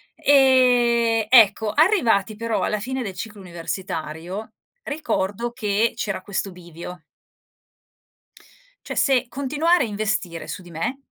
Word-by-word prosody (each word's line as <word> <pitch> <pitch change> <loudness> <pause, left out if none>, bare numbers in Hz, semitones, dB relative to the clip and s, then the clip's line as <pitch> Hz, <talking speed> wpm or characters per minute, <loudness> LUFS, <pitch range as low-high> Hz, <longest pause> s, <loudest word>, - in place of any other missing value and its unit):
E, 245 -5 +4
ecco, 220 -3 +5
arrivati 245 - +3
però 230 +1 -2
alla 210 - -1
fine 260 +4 -4
del 195 -6 -5
ciclo 210 -2 -7
universitario 175 +1 -6 0.3
ricordo 240 - -2
che 220 -1 0
c'era 195 -3 -3
questo 195 0 -4
bivio 175 0 -10 1.9
cioè - - -4
se 265 -2 +2
continuare 290 +6 +1
a - - -2
investire 200 -5 -3
su - - -6
di 175 - -14
me 195 - -3
220 Hz, 120 wpm, -22 LUFS, 190-255 Hz, 1.9 s, ecco